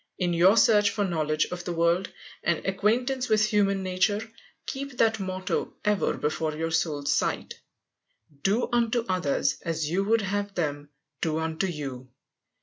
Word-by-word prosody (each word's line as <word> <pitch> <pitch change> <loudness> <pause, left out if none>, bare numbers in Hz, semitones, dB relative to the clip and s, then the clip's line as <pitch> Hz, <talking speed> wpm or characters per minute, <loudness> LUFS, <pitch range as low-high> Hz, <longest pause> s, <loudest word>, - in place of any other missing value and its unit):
_ - - -39
In 175 -2 0
your 185 +6 +5
search 210 -3 +5
for 205 - -1
knowledge 155 -4 0
of 180 0 -5
the 175 - -3
world, 170 +3 +1 0.3
and 170 -1 0
acquaintance 245 +7 0
with 215 0 +4
human 200 -2 +1
nature, 205 +4 0 0.3
keep 270 -1 -5
that 225 -2 +3
motto 185 -1 -3
ever 210 -1 +1
before 155 +1 -1
your 165 +1 -2
soul's 155 -3 0
sight, - - -1 0.8
"Do 205 +9 +1
unto 235 0 +1
others 180 -6 0
as 160 -2 -2
you 190 +3 +1
would 225 +2 +3
have 200 +1 -2
them 145 -3 -2 0.3
do 160 -2 0
unto 160 +3 -1
you." 135 -6 -6
185 Hz, 155 wpm, -27 LUFS, 160-210 Hz, 0.8 s, your